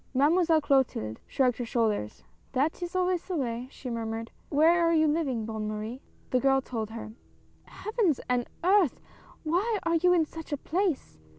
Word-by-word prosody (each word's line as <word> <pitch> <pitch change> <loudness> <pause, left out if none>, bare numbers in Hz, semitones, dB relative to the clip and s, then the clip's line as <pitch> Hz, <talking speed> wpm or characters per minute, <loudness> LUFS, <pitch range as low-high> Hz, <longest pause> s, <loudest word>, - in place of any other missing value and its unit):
Mademoiselle 320 +3 +4
Clotilde 260 - +1
shrugged 250 -3 +1
her - - -1
shoulders. 215 - -1
" - - -35
That 285 +7 0
is 350 +1 -5
always 365 -1 +1
the 370 - -3
way," 245 -2 -2
she 270 - -10
murmured. 225 0 -4
" - - -34
Where 330 +4 +4
are 335 - +3
you 315 -1 +4
living, 285 -8 0
Bonne 220 -1 -4
Marie? 215 +4 -5
" - - -32
The 255 - +3
girl 270 +1 +3
told 225 -5 -4
her. 220 -1 -7 0.3
" - - -34
Heavens 425 - 0
and 245 -1 0
Earth! 370 - +4 0.4
why 375 +8 +1
are 335 0 +2
you 360 +2 +4
in 340 -3 +4
such 320 +1 -10
a 290 - 0
place 335 - -2
280 Hz, 190 wpm, -28 LUFS, 230-335 Hz, 0.4 s, Mademoiselle